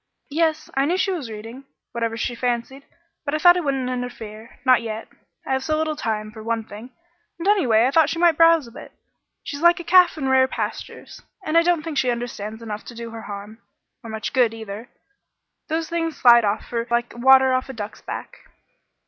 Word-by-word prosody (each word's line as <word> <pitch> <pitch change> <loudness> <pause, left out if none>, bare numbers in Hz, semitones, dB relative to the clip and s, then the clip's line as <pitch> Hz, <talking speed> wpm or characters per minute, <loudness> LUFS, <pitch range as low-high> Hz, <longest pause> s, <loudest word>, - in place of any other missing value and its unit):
"Yes, 315 0 0
I 270 +1 +1
knew 350 +5 +1
she 385 - +1
was 310 -10 -4
reading 225 +5 -9 0.3
whatever 230 -1 -2
she 240 - -2
fancied, 245 +3 -3 0.4
but 290 0 -2
I - - +2
thought 350 +3 +6
I - - +1
wouldn't 275 -5 -1
interfere 230 -3 -7
not 255 -3 +5
yet. 220 -1 -6 0.4
I - - -4
have 265 0 -1
so 310 +1 0
little 310 0 -1
time, 215 -6 -3
for 220 0 -11
one 230 0 -2
thing, 220 +3 -11 0.5
and, 340 +3 -4
anyway, 250 - +4
I 260 - +1
thought 315 0 +4
she 330 - -3
might 340 -1 +4
browse 330 -2 +5
a 235 - -13
bit. - - -12 0.5
She's 285 +1 -6
like 345 +1 +5
a - - -6
calf 360 -1 +5
in 270 -3 -2
rare 260 0 +4
pastures, - - -6 0.2
and 310 - -2
I 335 - +7
don't 340 -2 +1
think 310 -4 -2
she 255 - +1
understands 230 -2 -4
enough 210 -2 -6
to 240 - -10
do 230 0 -7
her 225 0 -8
harm 205 +1 -9 0.4
or 230 - -9
much 220 +4 -5
good, 240 -4 +3
either. 220 +1 -8 0.8
Those 320 0 -2
things 330 -1 -2
slide 235 -2 +6
off 205 +1 -1
from 235 - -3
her 230 - -4
like 235 0 0
water 265 +1 +5
off 255 +1 -1
a - - -5
duck's 210 -3 -7
back." - - -7
255 Hz, 215 wpm, -22 LUFS, 225-310 Hz, 0.8 s, I